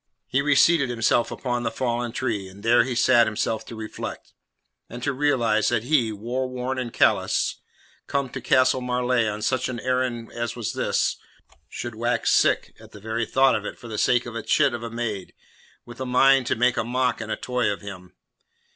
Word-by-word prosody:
He 130 - 0
reseated 145 0 +4
himself 120 0 +1
upon 120 -2 -3
the 115 - -1
fallen 120 0 -2
tree, 115 -6 -2
and 95 +2 -14
there 115 +2 +5
he 130 -2 -3
set 120 -1 +5
himself 110 0 -2
to 115 - -8
reflect, 110 -1 -7 0.6
and 120 +1 -8
to 140 - 0
realize 120 -6 +2
that 120 -2 0
he, 125 -4 +2
war 120 +5 -3
worn 130 +1 -3
and 120 -2 -4
callous, - - +2 0.5
come 140 -1 -1
to - - -7
Castle 130 -2 +3
Marleigh 125 -2 +1
on 105 +1 -5
such 130 -1 0
an 120 -2 -4
errand 125 -2 -2
as 120 -1 -4
was 120 -4 -3
his, - - 0 0.5
should 120 -1 -6
wax 120 +1 0
sick - - +2
at - - -16
the 105 - -11
very 110 +2 -3
thought 135 0 +4
of - - -1
it - - -6
for 120 - -11
the 110 -2 -4
sake 120 -1 +2
of 120 - -7
a 115 - -4
chit 140 +3 +2
of 120 - -4
a 115 - -5
maid, 115 -5 -5 0.5
with 120 +2 -11
a - - -2
mind 135 0 +4
to - - +1
make 125 +2 +2
a - - +1
mock 125 0 0
and 110 -1 -5
a - - 0
toy 125 -3 -1
of 100 - -3
him. 95 -3 -10
120 Hz, 205 wpm, -24 LUFS, 115-130 Hz, 0.6 s, there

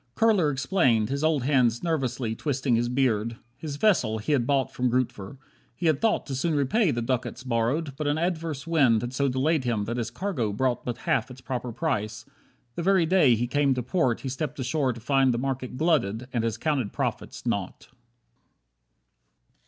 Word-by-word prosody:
Kurler 205 -9 +3
explained, 130 - +2
his 140 +2 -2
old 155 -5 +2
hands 125 -3 +2
nervously 130 -8 -1
Twisting 130 0 0
his 120 +1 0
beard. 115 -3 0 0.2
His 140 +2 -6
vessel 145 - +2
he 110 +7 -3
had 125 -5 +2
bought 140 -2 +1
From 125 0 0
Grootver. 120 -2 -2 0.4
He 175 - -5
had 155 -4 +2
thought 225 -1 +1
to 140 - -5
soon 150 +5 0
repay 165 - +2
The 120 -4 -1
ducats 125 0 -2
borrowed, 130 +5 -1
but 150 -1 -2
an 145 +1 +1
adverse 165 -4 -2
wind 135 -9 +3
Had 120 +1 -4
so 140 +1 +1
delayed 135 +3 +1
him 115 -4 -1
that 120 +3 -3
his 115 -2 -2
cargo 125 - -2
brought 125 +3 0
But 120 -2 -4
half 155 -3 +1
its 130 0 -11
proper 125 -2 -4
price, 110 -6 -2 0.5
the 170 - -4
very 185 -1 +3
day 160 -8 +4
He 120 +2 -1
came 140 +1 +1
to 125 - -2
port 130 -3 0
he 135 - -4
stepped 145 +2 -4
ashore 130 +1 0
to 115 - -8
find 135 +2 +2
The 120 - -1
market 130 0 -3
glutted 125 - +1
and 115 -2 0
his 115 -1 -1
counted 140 -9 -1
profits - - -4
naught. - - -3
130 Hz, 190 wpm, -26 LUFS, 120-155 Hz, 0.5 s, day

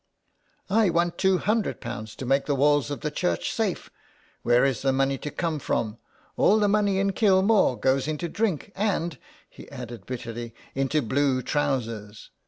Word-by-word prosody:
" - - -44 0.3
I 215 -1 +4
want 170 0 0
two 190 -1 +3
hundred 215 +3 0
pounds 110 -3 -6
to 130 - -6
make 135 +2 +1
the 145 - +1
walls 145 +1 +3
of 145 - -5
the 150 - -2
church 85 - -1
safe. - - -2 0.5
Where 120 +2 +4
is 135 -3 0
the 135 - +2
money 135 0 +1
to 150 - -5
come 165 -1 -2
from? 115 -4 -2 0.4
All 210 - +5
the 210 -1 +3
money 205 -1 +2
in 195 0 +1
Kilmore 195 - +3
goes 130 +1 +1
into 155 +2 -2
drink, 200 -1 -2
and," 175 - -1 0.3
he - - -14
added 120 -5 -9
bitterly, 115 -2 -6
" - - -26
into 135 +2 0
blue 130 +1 +1
trousers. 115 -8 -2
145 Hz, 180 wpm, -26 LUFS, 125-185 Hz, 0.5 s, All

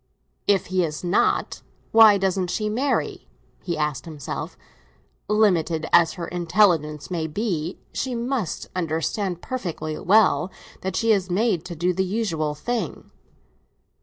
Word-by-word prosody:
"If 200 -2 +3
he 185 -1 +3
is 155 0 -4
not, 180 +3 +1 0.3
why 220 -2 +8
doesn't 190 -2 0
she 210 +3 -1
marry?" 260 +6 -1 0.3
he 170 -3 -3
asked 150 -2 -2
himself. 150 -6 -6 0.7
"Limited 175 -7 +2
as 170 -2 +6
her 170 -2 -5
intelligence 170 -4 +1
may 165 -3 -1
be, 175 -1 -2 0.2
she 260 -2 -2
must 235 - -2
understand 175 +2 -2
perfectly 165 -10 -4
well 185 -5 +3 0.3
that 190 0 -3
she 230 -1 +2
is 190 -3 +1
made 190 -2 +1
to 175 - -6
do 175 +3 +1
the 190 +2 0
usual 180 -7 -1
thing." 240 +10 -4
180 Hz, 135 wpm, -24 LUFS, 160-210 Hz, 0.7 s, why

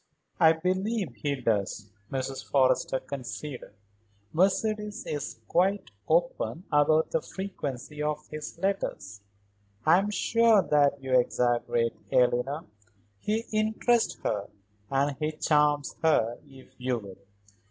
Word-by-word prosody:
"I 160 0 +7
believe 185 - -1
he 140 +6 -2
does," 105 -4 -1 0.2
Mrs. 135 0 -3
Forrester 130 -1 +2
conceded. 130 -2 -7 0.6
"Mercedes 210 +5 +1
is 145 -6 -4
quite 190 - +1 0.2
open 170 +1 0
about 155 +2 +3
the 160 - +1
frequency 150 -7 -6
of 150 0 -2
his 155 +1 -7
letters. 190 - -2 0.6
I 165 +4 +6
am 200 +2 -1
sure 225 +1 +4
that 145 -2 +2
you 130 -1 -2
exaggerate, 120 -1 +1 0.2
Eleanor. 125 +4 +2 0.5
He 220 - -1
interests 220 +2 +1
her, 100 -1 -1 0.4
and 140 0 +1
he 155 0 -1
charms 150 -2 +2
her 120 -8 +2
if 135 -2 -16
you 125 -1 0
will. 100 -4 -10
150 Hz, 115 wpm, -28 LUFS, 130-185 Hz, 0.6 s, I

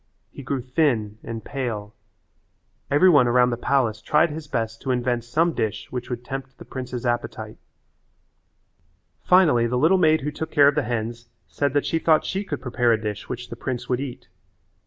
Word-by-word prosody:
He - - -10
grew 135 0 -2
thin 120 -6 0
and 115 -1 -6
pale. 115 -7 -4 1.0
Every 145 +6 +5
one 145 -8 +6
around 125 +1 +4
the - - 0
palace 120 -3 0
tried 155 +7 +3
his 155 0 -7
best 115 -3 -3
to 135 - -5
invent 125 -1 0
some 160 +8 +1
dish 110 -4 -3
which 125 0 -5
would 120 -1 -5
tempt 135 0 -6
the - - -12
prince's 125 -1 -6
appetite. 120 0 -3 1.6
Finally 155 -11 +4
the 125 +1 -1
little 165 +8 +4
maid 160 -2 +4
who 150 +2 -3
took 160 +2 -5
care 145 -3 +5
of - - -1
the 150 - +1
hens 115 0 -4 0.2
said 140 -2 -1
that 145 - +1
she 165 - 0
thought 160 -1 +3
she 195 +2 -2
could 145 -9 -5
prepare 120 -1 +1
a 110 - +2
dish 105 -2 -5
which 125 -1 -6
the - - -5
prince 120 +1 -4
would 125 -1 +1
eat. 135 -3 -7
125 Hz, 190 wpm, -23 LUFS, 120-145 Hz, 1.6 s, one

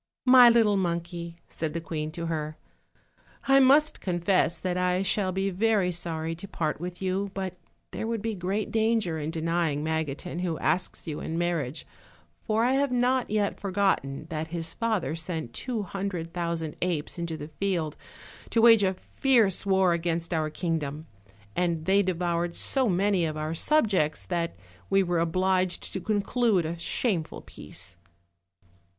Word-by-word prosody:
"My 250 -1 +9
little 225 -3 +4
monkey," 170 -1 -3
said 155 -2 -4
the - - 0
queen 155 -2 -4
to 170 +1 -4
her, 155 -2 -3 0.9
"I 270 0 +6
must 285 +3 +4
confess 175 -1 +1
that 180 +2 -2
I 180 +1 +1
shall 195 -1 +1
be 195 +1 -1
very 200 -1 +2
sorry 165 -2 -3
to 195 - -8
part 155 -6 -2
with 180 +1 -6
you, 190 +2 -1
but 190 -2 -3 0.4
there 220 - -4
would 225 -2 -2
be 225 -1 -1
great 195 +3 -2
danger 220 -7 +1
in 150 +1 -3
denying 165 -2 -1
Magotin, 160 +2 -3
who 175 -3 -1
asks 180 - -1
you 155 -3 -4
in 160 - -4
marriage, 165 -5 -1 0.6
for 220 0 +2
I 245 - +3
have 275 0 +2
not 250 +1 +1
yet 210 -1 0
forgotten 190 -8 0
that 160 0 -3
his 165 0 -2
father 210 - -1
sent 160 -6 -4
two 240 -5 -3
hundred 185 -3 -4
thou 170 -1 -1
sand 160 -2 -5
apes 175 -2 -2
into 170 -2 -3
the 150 0 -8
field 175 -6 -1 0.5
to 230 - +1
wage 225 -3 +8
a 190 -1 +1 0.2
fierce 225 -8 +3
war 190 -2 +4
against 170 0 -2
our 155 -1 0
kingdom, 155 -2 -3 0.5
and 170 -3 0
they 195 +2 +4
devoured 175 -2 -1
so 260 -4 +2
many 190 0 +2
of 155 -1 -2
our 155 +1 -2
subjects 190 - +2
that 170 -2 -2 0.3
we 195 0 +4
wore 175 -2 0
obliged 185 +2 0
to 190 - -3
conclude 210 -2 +1
a 165 +2 -3
shameful 170 -1 -1
peace. 85 - -6
180 Hz, 160 wpm, -27 LUFS, 165-200 Hz, 0.9 s, My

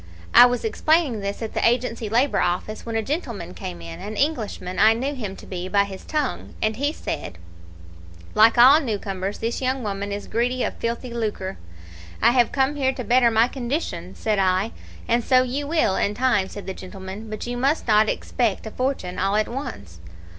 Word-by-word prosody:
I 245 - +10
was 245 - -2
explaining 315 - +2
this 200 +3 -4
at 220 - -5
the - - -1
Agency 235 -2 +1
Labour 245 +6 +2
Office, 180 +6 -2
when 230 - -3
a 225 - 0
gentleman 230 - -4
came 85 - -7
in 85 0 -8
an 215 +1 -6
Englishman 220 - -2
I 220 +1 +7
knew 265 +5 -2
him 210 -8 -5
to - - -12
be 180 -1 -5
by 200 +1 +3
his 195 -1 -8
tongue 300 -4 -3
and 215 0 0
he 285 +3 0
said 90 - -5 1.0
"'Like 225 +2 +5
all 260 +5 +8
new 230 -9 -2
comers, 195 0 -4
this 230 +3 -3
young 260 0 -1
woman 200 -1 -3
is 205 0 -4
greedy 245 +2 0
of - - -1
filthy 235 +1 -3
lucre.' 210 -5 -3 0.6
"'I 235 - +5
have 240 -2 +3
come 275 +1 +1
here 265 -1 +1
to 255 - -5
better 240 +2 +4
my 225 +1 +4
condition,' 240 - -4
said 215 -2 0
I. 190 +3 +2 0.4
"'And 235 0 +2
so 255 +1 +4
you 275 +3 -3
will, 310 - +2
in 205 - 0
time,' 240 -6 +2
said 205 - -8
the 190 - -4
gentleman, 190 +3 -8
'but 215 0 -5
you 245 0 -3
must 275 +5 0
not 215 0 +4
expect 230 -5 -1
a 220 - -6
fortune 255 -9 -2
all 195 +2 +1
at 215 0 +2
once.' 100 - -7
225 Hz, 200 wpm, -23 LUFS, 200-255 Hz, 1.0 s, I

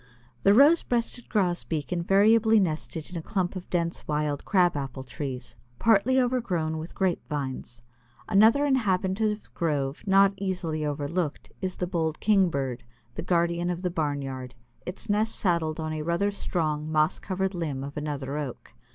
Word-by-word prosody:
The 200 +1 +5
Rose 295 +7 +7
breasted 240 0 -2
Grosbeak 175 -6 -1
invariably 215 +5 +4
nested 160 -2 -2
in 180 - -5
a - - -3
clump 185 +1 -2
of 185 -1 -7
dense 170 -1 -2
wild 150 -1 -1
Crab 180 -4 +3
apple 135 -2 -4
trees, 130 -1 -6 0.2
partly 230 - +4
overgrown 185 -11 0
with 160 +2 -8
grape 190 -2 0
vines. 130 -4 -5 0.4
Another 220 +7 +5
inhabitant 200 -7 +1
of 210 -1 0
the - - -17
grove 145 -4 -1
not 195 0 +5
easily 180 -5 -2
overlooked, 150 +2 -3
is 185 -1 -3
the 180 - -1
bold 165 -3 -2
Kingbird, 150 - +1 0.3
the - - -4
guardian 170 0 +1
of 180 +1 -3
the 180 - 0
barnyard, 140 -5 -3 0.3
its 180 - -5
nest 215 +2 +1
saddled 170 -4 0
on 155 0 -3
a 155 - -3
rather 170 +6 0
strong 155 -6 -2
moss 155 +2 +2
covered 190 0 -2
limb 150 -7 -3
of 140 +1 -7
another 145 -1 -3
Oak. 125 - -7
170 Hz, 160 wpm, -27 LUFS, 150-195 Hz, 0.4 s, Rose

